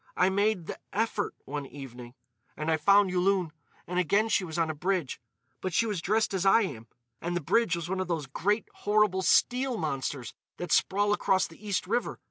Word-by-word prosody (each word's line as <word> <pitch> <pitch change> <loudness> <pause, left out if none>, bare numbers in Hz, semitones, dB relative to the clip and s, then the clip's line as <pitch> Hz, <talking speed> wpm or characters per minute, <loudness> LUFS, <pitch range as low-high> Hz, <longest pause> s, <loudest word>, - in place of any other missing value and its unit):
I 185 +1 +4
made 200 -2 +1
the - - -6
effort 215 -1 -1
one 145 0 -5
evening. 125 -3 -10 0.4
And 155 +1 -1
I 160 - +3
found 200 +4 +4
Yulun. 180 -2 +1 0.3
And 180 +1 -1
again 200 +6 +2
she 200 - +2
was 160 -3 -5
on 165 -1 +1
a - - -5
bridge. 175 -5 -2 0.4
But 185 - -3
she 230 - +3
was 205 -6 -2
dressed 215 +3 +1
as 190 -2 0
I 195 +4 +5
am. 115 - -6 0.3
And 175 +1 -2
the - - +1
bridge 180 +4 +2
was 170 -1 -4
one 190 +1 -2
of 185 - -2
those 165 -4 -2
great, 205 +10 -1
horrible 205 -2 +2
steel 250 +7 +2
monsters 135 - -3 0.2
that 175 - -5
sprawl 205 +2 +3
across 190 -2 +2
the 165 +5 -14
East 205 -3 -1
River. 245 - -1
185 Hz, 200 wpm, -28 LUFS, 160-205 Hz, 0.4 s, I